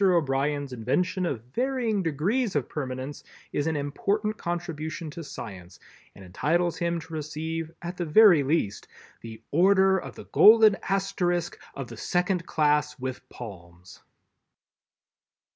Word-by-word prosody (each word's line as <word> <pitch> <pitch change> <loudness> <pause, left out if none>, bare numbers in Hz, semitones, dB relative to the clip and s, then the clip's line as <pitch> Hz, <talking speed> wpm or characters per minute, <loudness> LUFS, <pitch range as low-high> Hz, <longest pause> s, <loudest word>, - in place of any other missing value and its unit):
O'Brien's 145 -5 +1
invention 180 - 0
of 120 -8 -3
varying 245 -5 0
degrees 185 - 0
of 140 -4 0
permanence 130 -1 -5 0.3
is 145 - 0
an 160 - 0
important 200 +9 -1
contribution 165 -3 -4
to 170 - -7
science 95 - -9 0.4
and 95 - -12
entitles 165 - 0
him 170 0 0
to 165 0 -12
receive 160 +1 -4
at 175 +1 -5
the 175 - -2
very 175 0 +7
least 135 -8 -1 0.3
the 110 -1 -10
Order 190 +3 +4
of - - -9
the - - -10
Golden 220 -1 +7
Asterisk 185 -3 -1 0.2
of 135 - -5
the 115 - -10
Second 180 - -1
Class 150 -1 +1
with 130 -1 -6
Palms. 90 -5 -11
160 Hz, 130 wpm, -26 LUFS, 135-180 Hz, 0.4 s, very